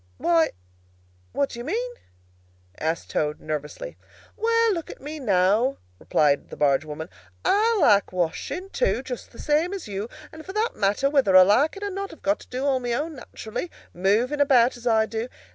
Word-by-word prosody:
"Why, 165 - +3 0.8
what 280 - 0
do 235 - -7
you - - -5
mean?" 465 - -2 0.9
asked 160 +1 -2
Toad, 150 0 -1
nervously. 155 - -5 0.4
"Well, 460 0 +2
look 335 -3 -5
at - - -9
me, 300 +3 -7
now," 215 +3 +2 0.2
replied 145 -2 +1
the - - -9
barge 140 -1 +3
woman. 155 +1 -6 0.4
"I 430 +4 +3
like 205 - +4
washing, 185 - -3
too, - - 0
just - - -7
the - - -15
same 320 +6 +1
as 380 - -7
you 200 +1 -4
do; - - -18 0.2
and 315 0 -10
for 380 - -8
that 435 +3 0
matter, 205 +7 +1
whether 265 -10 +4
I 185 - +10
like 245 - +3
it 400 - -7
or 405 - -2
not 395 +1 -4
I - - -11
have - - -17
got 300 +2 +1
to - - -15
do 255 +2 -3
all 270 -2 +2
my 245 -1 -2
own, 305 +6 -2
naturally, 235 +6 -6 0.2
moving 220 +11 +1
about 260 -4 +4
as 240 0 -7
I 220 -1 +4
do. 225 +2 -4
255 Hz, 195 wpm, -25 LUFS, -, 0.9 s, I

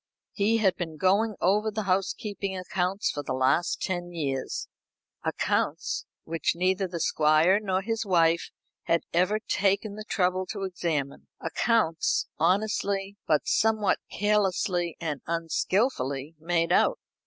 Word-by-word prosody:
He 215 +2 +2
had 195 -4 +3
been 165 -3 -5
going 200 +6 +2
over 210 +4 +2
the 215 0 -3
housekeeping 195 +1 -1
accounts 185 +1 -1
for 145 - -4
the 130 -2 -3
last 130 +7 +1
ten 175 -1 -3
years 140 -6 -3 0.6
accounts - - -1 0.2
which 165 0 -1
neither 185 +2 +1
the 170 -1 -5
Squire 160 +4 +4
nor 190 -2 -1
his 225 +1 -1
wife 170 -4 +2 0.4
had 170 - +2
ever 180 +5 +3
taken 200 -1 0
the 215 +1 -7
trouble 185 -1 0
to 200 -2 -5
examine 165 -7 -3
accounts 165 -1 +1
honestly, 195 +2 +1
but 150 -2 +2
somewhat 215 -2 +2
carelessly 190 -4 +1
and 150 -4 -3
unskillfully 165 - -1
made 170 +1 0
out. - - +4
185 Hz, 130 wpm, -27 LUFS, 165-205 Hz, 0.6 s, Squire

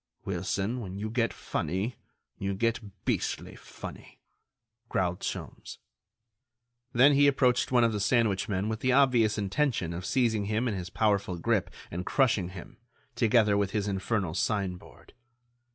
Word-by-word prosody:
"Wilson, 95 +5 -2
when 95 -4 -6
you 110 +2 -4
get 115 0 +1
funny, 100 +7 -3 0.4
you 100 0 -2
get 115 +3 +1 0.3
beastly - - -2
funny," - - -11 0.7
growled 90 -1 0
Sholmes. - - -6 1.1
Then 130 +4 +6
he 145 +1 +5
approached 130 -3 +2
one 125 -2 +5
of 115 -1 +2
the 105 - -1
sandwich 105 -1 +1
men 100 +1 -1
with 110 0 -2
the 130 0 +2
obvious 125 -6 +4
intention 105 - 0
of 90 +2 -5
seizing 110 0 +1
him 110 +4 0
in 115 - 0
his 90 -2 -5
powerful 100 -3 +1
grip 85 - 0 0.2
and 90 +2 -3
crushing 110 -7 +2
him, 95 -2 -10 0.4
together 110 -3 +4
with 100 -1 0
his 105 -1 0
infernal 95 -2 -1
sign 95 -1 0
board. - - -17
105 Hz, 150 wpm, -29 LUFS, 95-120 Hz, 1.1 s, Then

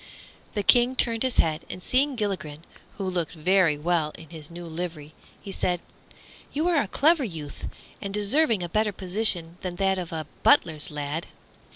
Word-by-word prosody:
The 205 - 0
King 245 +3 +5
turned 230 -3 +3
his 260 -2 +1
head, 155 0 +2
and 180 - -7
seeing 270 +2 +2
Gilligren, 185 -9 -3 0.3
who 200 - -4
looked 175 -4 -2
very 170 -1 +3
well 160 -1 0
in 160 -1 -13
his 155 -3 -9
new 175 +1 -8
livery, 160 -2 -6 0.3
he 195 - -8
said, 180 -2 0 0.7
"You 310 +4 0
are 330 -5 +3
a 210 - -3
clever 305 - +3
youth, 160 - -6 0.3
and 200 - -4
deserve 210 +10 +3
a 190 -6 0
better 210 +4 0
position 180 -3 0
than 180 -1 -4
that 190 0 +1
of 180 -1 -6
a 160 -1 -4 0.2
butler's 160 - +3
lad. 150 +2 -4
180 Hz, 175 wpm, -26 LUFS, 160-215 Hz, 0.7 s, King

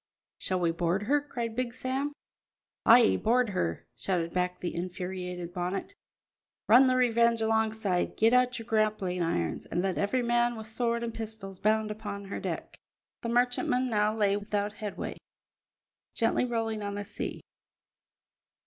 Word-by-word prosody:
"Shall 185 -1 -1
we 170 -2 +2
board 175 +3 0
her?" 290 +7 +2
cried 235 -6 -4
Big 245 -1 -2
Sam. 265 +3 -2 0.8
"Ay, 235 0 +7
board 240 +1 +2
her!" 85 - -2
shouted 170 -3 -1
back 180 0 0
the 175 - -3
infuriated 180 0 -4
Bonnet. 180 - -3 0.7
"Run 250 +4 +7
the 255 - +3
Revenge 235 -2 +3
alongside, 220 -4 0
get 225 +2 +4
out 250 0 +3
your 225 - -7
grappling 215 -5 0
irons, 85 - -1
and 175 +2 -1
let 190 -2 -1
every 245 +5 +1
man 240 0 +2
with 220 -1 -7
sword 235 +1 -1
and 230 -1 -3
pistols 215 -4 -7
bound 215 0 +2
upon 205 -2 -6
her 195 - -5
deck." - - -5 0.4
The 235 - -3
merchantman 245 +1 +2
now 210 0 +2
lay 200 -2 +3
without 205 0 -2
headway, 210 -2 -5 1.0
gently 230 +2 +2
rolling 225 -3 -2
on 200 0 -3
the 205 0 -4
sea. - - -5
215 Hz, 150 wpm, -29 LUFS, 190-235 Hz, 1.0 s, Ay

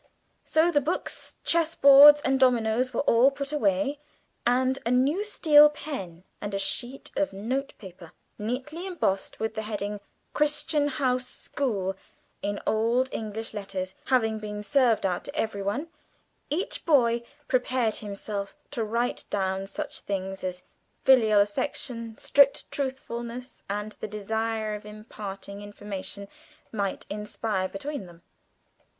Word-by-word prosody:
So 325 +2 +3
the 290 -3 +3
books, 320 +6 -3
chess 330 -1 +2
boards, 285 +1 +9
and 265 -1 +1
dominoes 245 -1 +3
were 235 - 0
all 250 -1 +5
put 280 0 -4
away, 290 -1 +1 0.5
and 260 +2 +2
a 230 - -1
new 270 +10 +2
steel 300 -8 +6
pen 195 - -7 0.2
and 205 -1 -3
a - - +1
sheet 245 +6 -2
of 295 -7 0
notepaper, 200 -6 -5 0.3
neatly 260 - -4
embossed 195 - -1
with 220 0 -2
the 220 - -3
heading 210 -1 -4 0.3
"Crichton 300 0 +2
House 255 -3 0
School" 200 -9 -2 0.5
in 205 0 -2
old 235 +4 +2
English 220 +1 -4
letters, 195 -2 -4
having 225 -4 +2
been 210 -1 -5
served 245 -3 +3
out 180 -2 0
to 285 - -7
everyone, 210 +6 -2 0.6
each 335 +7 -2
boy 240 -7 +4 0.3
prepared 250 -3 +1
himself 200 -1 -5 0.2
to 240 -6 -2
write 235 +3 -1
down 190 -1 -1
such - - -5
things 195 -1 -4
as 180 0 -4 0.4
filial 225 -6 +6
affection, 230 +2 -2
strict 280 -1 +4
truthfulness, 250 -2 -4
and 210 +1 -3
the - - -4
desire 220 +1 -2
of 210 - -6
imparting 205 -2 -8
information 205 -1 -7 0.4
might 200 -3 -2
inspire 210 -2 -2
between 275 0 -5
them. 170 0 -16
225 Hz, 130 wpm, -27 LUFS, 205-275 Hz, 0.6 s, boards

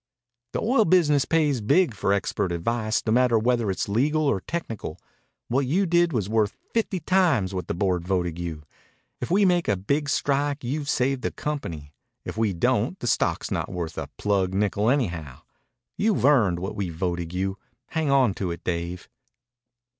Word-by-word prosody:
"The - - -1
oil 225 -1 +3
business 150 -6 +4
pays 150 -6 +1
big 170 - +3
for 100 -1 -1
expert 100 -2 0
advice, 110 +5 -1
no 110 - +1
matter 120 0 +4
whether 120 -1 +1
it's 95 - -1
legal 145 +9 +1
or 125 -10 +1
technical. 115 - -5 0.5
What 130 +2 +1
you 185 +9 +2
did 175 -1 +3
was 110 -8 -1
worth 110 -1 0 0.2
fifty 215 -5 0
times 155 - +2
what 90 -1 -4
the - - -2
board 90 -2 0
voted 90 -3 -1
you. 80 -3 -5 0.6
If - - -4
we 200 +3 +4
make 175 -2 +2
a 105 - +2
big 140 +10 -1
strike 145 -1 0
you've 140 +4 -3
saved 130 +1 +1
the - - -1
company. 80 - -5 0.3
If - - -5
we 110 -2 +1
don't 85 -3 0
the - - -7
stock's - - 0
not - - -2
worth 85 -3 -4
a - - -4
plugged 95 -2 0
nickel 105 +2 +1
anyhow. 85 - -1 0.6
You've 210 - +1
earned 115 -12 +4
what 95 +3 -4
we 100 -3 -2
voted 85 0 -3
you. 95 +2 -2 0.3
Hang 160 -3 -1
on 135 -6 +4
to 95 -1 -3
it, 85 - -6
Dave." 85 0 -3
110 Hz, 175 wpm, -25 LUFS, 90-145 Hz, 0.6 s, business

